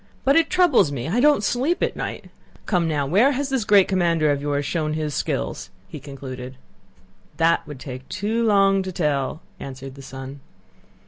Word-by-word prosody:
"But 275 +1 +3
it 330 -1 +4
troubles 345 - +4
me. 130 -3 -4
I 205 +9 0
don't 290 -5 +4
sleep 275 - 0
at - - -1
night. - - -6 0.3
Come 175 -5 +1
now, 150 -3 0
where 210 - +4
has 275 +1 -2
this 265 -4 0
great 200 -2 +5
commander 170 -5 +2
of 140 -1 -1
yours 145 0 -1
shown 155 0 -1
his 155 -1 -2
skill?" - - -2 0.3
he 150 - -8
concluded. 130 -2 -8 0.8
"That 165 -1 +2
would 145 -3 -8
take 130 -1 -8
too 215 +4 -1
long 195 -3 +4
to 190 0 -5
tell," 150 -4 -1 0.2
answered 135 0 -8
the 135 - -12
son. 135 +1 -9
160 Hz, 180 wpm, -23 LUFS, 140-210 Hz, 0.8 s, great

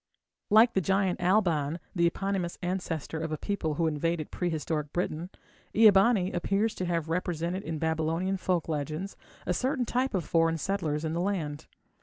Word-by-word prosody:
Like 220 +3 +6
the 190 - +2
giant 190 0 +1
Alban, 170 -6 +2 0.2
the 170 -1 +4
eponymous 190 0 -2
ancestor 175 -4 -3
of 160 0 -3
a 155 - -1
people 165 -4 -2
who 165 - +1
invaded 160 +1 -1
prehistoric 160 -3 -2
Britain, 175 -1 -2 0.5
Ea 220 -1 +8
bani 195 -1 +3
appears 200 +5 0
to 185 - -3
have 170 -2 -1
represented 175 +1 -2
in 165 -5 -4
Babylonian 160 +4 0
folk 180 -3 0
legends 155 +5 -3 0.3
a 180 - +1
certain 255 - 0
type 250 0 0
of 175 -5 -1
foreign 165 0 +2
settlers 160 -4 -1
in 160 - -2
the 170 - -1
land. 160 -6 -2
175 Hz, 165 wpm, -29 LUFS, 160-195 Hz, 0.5 s, Ea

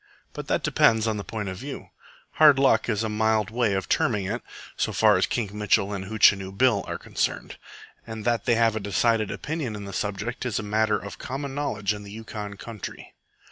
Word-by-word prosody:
But - - -7
that - - 0
depends 110 -1 +3
on 110 -2 0
the 100 - -4
point 105 -1 -5
of 95 - -6
view. 135 +5 -8 0.5
Hard 150 -3 +8
luck 135 -2 +3
is 110 -1 0
a - - 0
mild 110 0 +1
way 115 -3 +1
of 95 - -2
terming 105 -5 +1
it - - -3 0.3
so - - -1
far 110 -2 +4
as 95 - +2
Kink 105 -5 -2
Mitchell 105 -1 +1
and 95 -1 -4
Hootchinoo 100 -2 +3
Bill 125 -5 +3
are - - -3
concerned; - - -3 0.5
and 110 -1 -7
that 120 -3 +1
they 120 - +3
have 115 -1 +3
a - - -1
decided 105 +2 +1
opinion 145 -7 -4
on 100 -1 -7
the 100 - -8
subject 105 +5 -3
is 125 -4 -2
a - - -2
matter 110 +1 +1
of 100 - -9
common 135 +1 -5
knowledge 110 -8 -1
in 105 - -8
the 100 - -10
Yukon 105 -2 -7
country. 110 -2 -8
110 Hz, 210 wpm, -25 LUFS, 100-115 Hz, 0.5 s, Hard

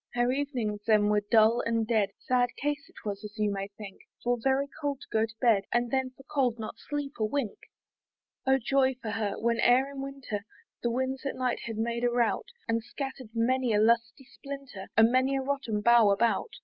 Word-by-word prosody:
Her 245 +1 +2
evenings 255 -7 -2
then 210 -2 +4
were 210 0 +3
dull 225 +1 +5
and 230 -1 0
dead; 215 -3 +2
Sad 250 -1 +1
case 290 0 -2
it - - -16
was, 205 0 -4
as 210 +1 -9
you 210 -1 +1
may 195 0 -3
think, 200 -1 -11 0.2
For 245 0 +2
very 270 +2 +2 0.2
cold 285 -2 -1
to - - -11
go 220 0 +2
to 220 - -15
bed, 220 -5 +3
And 240 0 +1
then 265 -1 +1
for 270 - -14
cold 265 -5 0
not 220 -1 -7
sleep 290 -1 -4
a - - +1
wink. 225 0 -2 0.9
Oh 265 0 +5
joy 265 +1 +2
for 220 -3 -4
her! 210 -2 -1
when 235 0 0
e'er 260 +4 +4
in 275 -1 -6
winter 270 -7 -5 0.4
The 240 - 0
winds 260 +2 -2
at - - -3
night 255 -1 -1
had 225 -2 -4
made 235 +1 -1
a 245 - +4
rout, 240 - +1 0.2
And 230 0 +1
scatter'd 265 -1 -6
many 250 +1 +2
a 210 - +3
lusty 230 +3 +2
splinter, 275 -8 -9
And 225 +1 +6
many 260 +2 +2
a - - -1
rotten 260 -6 -1
bough 235 -1 +6
about. 225 - +2
240 Hz, 210 wpm, -29 LUFS, 220-265 Hz, 0.9 s, And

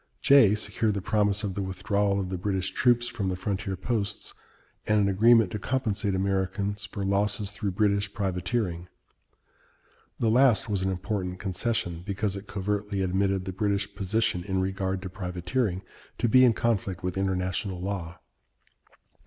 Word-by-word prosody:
Jay 130 -7 +6
secured 105 0 -1
the - - -1
promise 105 0 +1
of 100 -2 -2
the 100 - -3
withdrawal 100 +1 0
of 95 -2 -3
the 95 - -3
British 95 -1 -1
troops 120 -1 +3
from 100 -5 -2
the 90 - -1
frontier 95 0 -3
posts 105 +1 -3 0.5
and 105 0 +3
an 100 - +3
agreement 110 +1 +5
to 105 - -3
compensate 110 -4 -1
Americans 100 +1 -1
for 100 -2 -5
losses 100 +1 0
through 100 0 -3
British 100 +1 +1
privateering. 95 -2 -2 1.3
The 115 -2 +2
last 125 -1 +4
was 100 -3 -1
an 95 - 0
important 95 -1 -3
concession, 95 -2 -2
because 100 +1 -2
it 100 +1 -8
covertly 100 0 -2
admitted 95 0 0
the 95 - -4
British 100 0 -1
position 100 -2 0
in 95 -1 -1
regard 95 0 -2
to 95 - -5
privateering 95 +2 -2 0.3
to - - +1
be 130 +3 +6
in 120 - +5
conflict 100 -6 -1
with 90 0 -2
international 95 0 -1
law. 90 -2 -4
100 Hz, 155 wpm, -27 LUFS, 95-105 Hz, 1.3 s, Jay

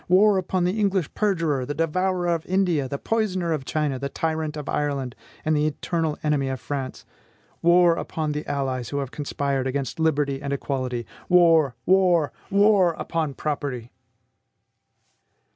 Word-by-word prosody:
War 195 +2 +5
upon 185 0 -1
the 185 +5 0
English 195 -5 0
perjurer, 165 -10 0
the 145 +3 -4
devourer 180 +3 0
of 165 -2 0
India, 180 -7 +1
the 140 - -3
poisoner 185 -4 0
of 140 -4 -3
China, 150 -3 -1
the 140 +1 -3
tyrant 160 0 -2
of 150 -1 -6
Ireland, 140 -4 -2 0.3
and 155 0 +2
the 150 +1 +2
eternal 160 0 -2
enemy 150 -3 +1
of 130 -1 -3
France! 135 -3 -5 0.6
War 175 0 +5
upon 155 -2 -3
the 150 0 -3
allies 130 -3 -2
who 140 - -3
have 135 -2 -3
conspired 140 -2 -2
against 135 +2 -3
liberty 145 -4 +1
and 140 -1 -4
equality! 130 -4 -3 0.2
War! 165 -7 +5
war! 180 -5 +3 0.2
war 200 -3 +4
upon 160 -5 -2
property!" 140 -5 -3
155 Hz, 150 wpm, -24 LUFS, 140-175 Hz, 0.6 s, War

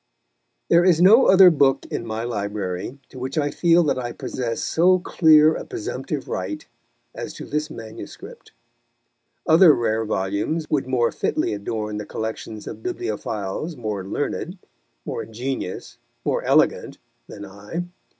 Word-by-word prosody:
There 170 +1 +5
is 175 -3 +4
no 210 +8 +7
other 190 -1 +8
book 140 -4 +2
in 115 - -4
my 110 +1 -3
library 100 -1 -4
to 130 - -11
which 130 +4 -5
I 145 -1 +1
feel 170 0 +4
that 145 -4 0
I 120 -1 -4
possess 115 -3 -4
so 180 +3 +3
clear 160 -3 +5
a - - -5
presumptive 370 -1 -5
right 310 +1 -4 0.5
as - - -7
to - - -8
this 150 +1 -2
manuscript. 155 - -10 0.9
Other 160 -1 +7
rare 115 -1 0
volumes 105 +10 -2
would 140 -4 0
more 125 -3 +1
fitly - - -1
adorn 105 +1 -4
the 105 - -5
collections 110 -1 -5
of - - -8
bibliophiles 155 - -4
more 105 -5 -4
learned, 145 - -3 0.5
more - - -4
ingenious, 115 -2 -5 0.3
more - - 0
elegant, - - +2 0.3
than 100 - -9
I. 100 - -6
130 Hz, 140 wpm, -22 LUFS, 110-170 Hz, 0.9 s, other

